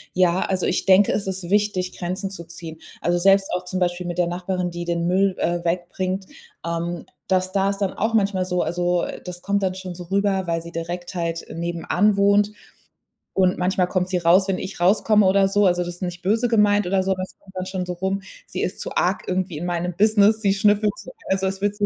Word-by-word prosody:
Ja, 180 0 +3
also 190 -1 0
ich - - 0
denke, 195 +1 +5
es 200 - -1
ist 190 -2 -4
wichtig, 205 -3 0
Grenzen 185 +2 -3
zu 180 -3 -7
ziehen. 165 -1 -10 0.2
Also, 175 +1 +1
selbst 195 +2 +4
auch 180 - -3
zum 185 +1 -4
Beispiel 175 0 -1
mit 175 0 -4
der 175 -1 +2
Nachbarin, 180 +1 -2
die 175 0 -5
den 170 0 -1
Müll, 190 +1 +2
äh, 175 0 0
wegbringt, 185 +2 -2 0.4
ähm, 170 0 -3 0.2
das 185 0 +1
da 195 0 +2
ist 200 - -2
dann 195 -2 -1
auch 225 +2 -1
manchmal 195 -4 +2
so. 180 -1 -1
Also, 175 +1 0
äh, - - -5
das 180 -1 -8
kommt 200 +1 0
dann 185 -1 +1
schon 185 -2 -7
so 180 - -8
rüber, 195 0 0
weil 165 -1 -1
sie 170 0 -10
direkt 175 +2 -5
halt 170 -1 -2
nebenan 175 +4 0
wohnt. 205 +1 +4 0.8
Und 185 -1 +2
manchmal 180 0 +1
kommt 185 0 -1
sie 185 - +1
raus, 180 +3 +4
wenn 190 -1 0
ich 190 - -6
rauskomme 210 +3 +4
oder 195 +1 +4
so, 205 +1 +2
also 180 0 +2
das 175 0 -6
ist - - -12
nicht 175 0 -5
böse 220 +5 +2
gemeint 210 -2 +3
oder 190 0 +1
so, 190 - 0
aber 185 -1 -1
es 185 - -7
kommt 190 -1 -19
dann 185 0 -3
schon 185 -1 -3
so 180 - -3
rum. 190 +2 -2 0.3
Sie - - -4
ist 180 - -3
zu - - -5
arg 185 +2 +1
irgendwie 185 -3 -2
in 175 - -4
meinem 175 0 -2
Business. 215 +1 +4
Sie 200 -2 +3
schnüffelt 205 +1 +3
so, - - -10 0.2
also 190 0 +1
es 195 +1 -4
wird 205 0 0
so 205 0 0
185 Hz, 235 wpm, -22 LUFS, 175-195 Hz, 0.8 s, denke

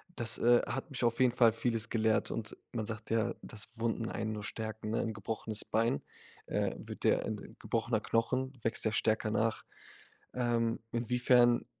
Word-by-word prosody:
Das, 115 0 +2
äh, 120 0 +5
hat 135 - -3
mich 125 - -3
auf 115 0 +2
jeden 125 -2 +4
Fall 115 -3 +5
Vieles 115 -1 0
gelehrt 110 -1 +2
und 110 -2 -4 0.2
man 110 -3 -2
sagt 110 -1 -5
ja, 115 +1 +1
dass 105 -1 -3
Wunden 115 0 -1
einen 110 0 -2
nur 105 -1 -5
stärken, 110 0 -4
ne? 115 - +1
'N 110 - -2
gebrochenes 110 +1 -3
Bein, 110 -10 +1 0.5
äh, - - 0
wird - - -8
der, - - +4
äh - - -4
'n - - -6
gebrochener 115 -1 0
Knochen 130 +5 0
wächst 115 - 0
ja 110 - +2
stärker 110 0 +2
nach. 110 +1 0 0.7
Ähm, 120 -2 +1
inwiefern 120 0 +3
115 Hz, 180 wpm, -32 LUFS, 110-120 Hz, 0.7 s, äh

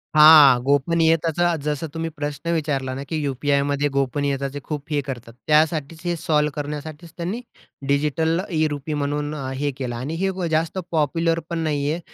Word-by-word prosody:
हां, 150 -4 +9
गोपनीयताचा 165 +4 +2
जसं 150 +2 -2
तुम्ही 165 0 -3
प्रश्न 145 +3 -3
विचारला 140 -5 -1
ना, 135 - -5
की 160 - -2
यू-पी-आयमध्ये 140 +1 0
गोपनीयताचे 140 +1 -1
खूप 150 -1 -5
हे 145 - +1
करतात. 120 -3 -6
त्यासाठीच 155 0 +2
हे 175 - 0
सॉल्व्ह 150 -2 +1
करण्यासाठीच 150 +2 -6
त्यांनी 185 +8 -3 0.5
डिजिटल 150 +4 +1
ई-रुपी 155 -2 -1
म्हणून 145 +1 -2
अ, 135 -3 -4
हे 145 +2 -1
केलं. 125 -3 -4
आणि 135 +7 -4
हे 195 - +2 0.2
जास्त 160 +3 0
पॉप्युलर 165 +2 +1
पण 170 -1 -2
नाहीये. 150 +1 -1
150 Hz, 150 wpm, -22 LUFS, 140-160 Hz, 0.5 s, हां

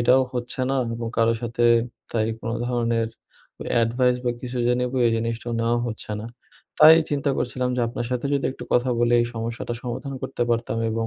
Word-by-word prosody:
এটাও 130 +2 +5
হচ্ছে 125 +1 -3
না 135 - +1 0.2
এবং 115 0 -4
কারো 115 0 +4
সাথে 120 0 -1 0.5
তাই 110 -2 +1
কোনো 115 0 -3
ধরনের 115 -2 0 0.6
অ্যাডভাইস 125 +2 +2
বা 120 - +2
কিছু 125 0 -4
যে 120 - +4
নেব 125 0 -1
এই - - +3
জিনিসটাও 115 +1 -3
নেওয়াও 120 +1 +1
হচ্ছে 110 -2 -5
না। 110 - -6 0.5
তাই 155 +1 +10
চিন্তা 145 0 0
করছিলাম 125 0 -1
যে - - +1
আপনার 120 - -4
সাথে 125 +2 -1
যদি 140 - 0
একটু - - -9
কথা 125 +1 +3
বলি 120 0 +2
এই 120 - +1
সমস্যাটা 115 +1 -4
সমাধান 130 +3 -5
করতে 130 -2 -2
পারতাম 115 -1 0
এবং 115 0 -1
120 Hz, 190 wpm, -24 LUFS, 115-125 Hz, 0.6 s, তাই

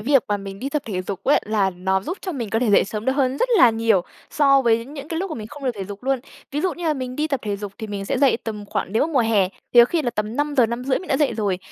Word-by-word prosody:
việc 270 +3 +3
mà 205 - +1
mình 195 -1 -8
đi 270 +6 -3
tập 295 0 -2
thể 185 -4 -3
dục 195 +1 -6
á, 285 - +4
là 205 -3 +1
nó 190 +1 -1
giúp 355 - -5
cho 370 - -4
mình 235 -8 -4
có 225 - +1
thể 235 -2 +1
dậy 205 - +5
sớm 210 +2 -5
được 265 - +2
hơn 265 -1 +1
rất - - +1
là 245 - +8
nhiều 225 -3 +2 0.3
so 275 -2 +4
với 230 -1 +2
những 280 +2 -9
cái 330 -1 -2
lúc 380 -1 -3
mà - - -3
mình 215 -2 -6
không 285 +5 -10
được 255 - +2
thể 195 - -5
dục 200 +1 -9
luôn. 265 0 0 0.3
Ví 290 +2 -2
dụ 370 0 0
như 350 - -7
là 310 - +2
mình 255 -2 -5
đi 305 +1 0
tập 275 -4 -1
thể 205 -2 -2
dục 200 -1 -7
thì 220 - -5
mình 200 -1 -5
sẽ - - -1
dậy 275 -4 +4
tầm 210 -2 -5
khoảng 195 - -3
nếu 230 +7 +2
mà 325 - -7
mùa 265 - +4
hè 215 -5 +2 0.3
thì 240 - +10
có - - +9
khi 320 +6 -1
là 245 - 0
tầm 215 +1 -3
5:00-5:30 260 -3 +1
mình 370 - -11
đã 265 - +2
dậy 290 -4 +2
rồi. 200 -4 0
235 Hz, 325 wpm, -22 LUFS, 210-280 Hz, 0.3 s, thì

